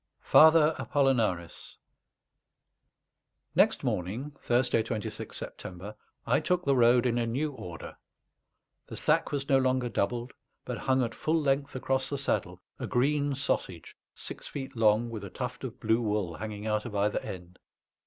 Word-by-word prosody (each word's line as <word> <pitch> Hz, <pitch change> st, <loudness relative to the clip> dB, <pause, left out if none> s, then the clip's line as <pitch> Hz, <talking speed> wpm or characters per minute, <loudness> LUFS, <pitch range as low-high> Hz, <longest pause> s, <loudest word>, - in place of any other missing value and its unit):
FATHER 160 Hz, 0 st, +7 dB
APOLLONARIS 115 Hz, -, 0 dB, 1.8 s
Next -, -, +3 dB
morning 110 Hz, +12 st, -2 dB
(Thursday, 120 Hz, -1 st, +2 dB
26th 110 Hz, -1 st, -5 dB
September) 95 Hz, +4 st, -8 dB, 0.3 s
I -, -, +3 dB
took 180 Hz, +3 st, 0 dB
the 140 Hz, -1 st, +3 dB
road 120 Hz, 0 st, +5 dB
in 120 Hz, -1 st, +1 dB
a 115 Hz, -, 0 dB
new 140 Hz, +6 st, -1 dB
order. 90 Hz, -10 st, -9 dB, 0.9 s
The -, -, -8 dB
sack -, -, +2 dB
was 140 Hz, -1 st, -2 dB
no 135 Hz, -1 st, +4 dB
longer 130 Hz, -1 st, +1 dB
doubled, 120 Hz, +4 st, -2 dB, 0.3 s
but -, -, -4 dB
hung 130 Hz, -1 st, +2 dB
at 115 Hz, -2 st, -3 dB
full 160 Hz, +7 st, 0 dB
length 140 Hz, -1 st, 0 dB
across 130 Hz, 0 st, -1 dB
the 140 Hz, -, -2 dB
saddle, 135 Hz, -, -2 dB, 0.2 s
a -, -, -3 dB
green 145 Hz, +2 st, +1 dB
sausage 95 Hz, -, -3 dB, 0.2 s
six -, -, -8 dB
feet 135 Hz, -3 st, -6 dB
long 115 Hz, +1 st, +3 dB
with 110 Hz, -3 st, -6 dB
a 100 Hz, -, -6 dB
tuft 125 Hz, +6 st, -5 dB
of 125 Hz, -3 st, -6 dB
blue 110 Hz, +1 st, +2 dB
wool 105 Hz, -6 st, -1 dB
hanging 105 Hz, -1 st, -6 dB
out 105 Hz, -1 st, 0 dB
of 110 Hz, -3 st, -6 dB
either 100 Hz, +1 st, +1 dB
end. 90 Hz, -1 st, -9 dB
120 Hz, 155 wpm, -29 LUFS, 105-135 Hz, 1.8 s, FATHER